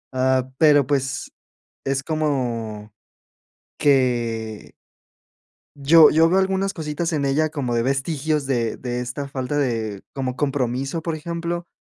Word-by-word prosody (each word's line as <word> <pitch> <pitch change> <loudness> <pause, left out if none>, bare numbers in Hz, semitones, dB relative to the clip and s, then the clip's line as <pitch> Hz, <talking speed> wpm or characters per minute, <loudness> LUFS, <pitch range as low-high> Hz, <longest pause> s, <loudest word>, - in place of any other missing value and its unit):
Ah, 130 0 +1
pero 145 -3 +5
pues 135 -2 -1 0.5
es 135 0 -1
como 120 -9 -2 0.9
que 120 -6 0 1.0
yo 150 +3 +7
yo 165 +1 +4
veo 185 +2 +3
algunas 190 +1 0
cositas 160 0 -3
en 145 -2 0
ella, 150 +3 +1
como 135 -6 -2
de 115 - +1
vestigios 140 +3 -1
de 120 -4 -1
de 125 0 -3
esta 125 +3 -5
falta 135 +1 -3
de 115 -7 -1
como 130 -2 -3
compromiso 135 +2 -1
por 165 0 -3
ejemplo, 170 +2 -4
135 Hz, 125 wpm, -22 LUFS, 125-155 Hz, 1.0 s, yo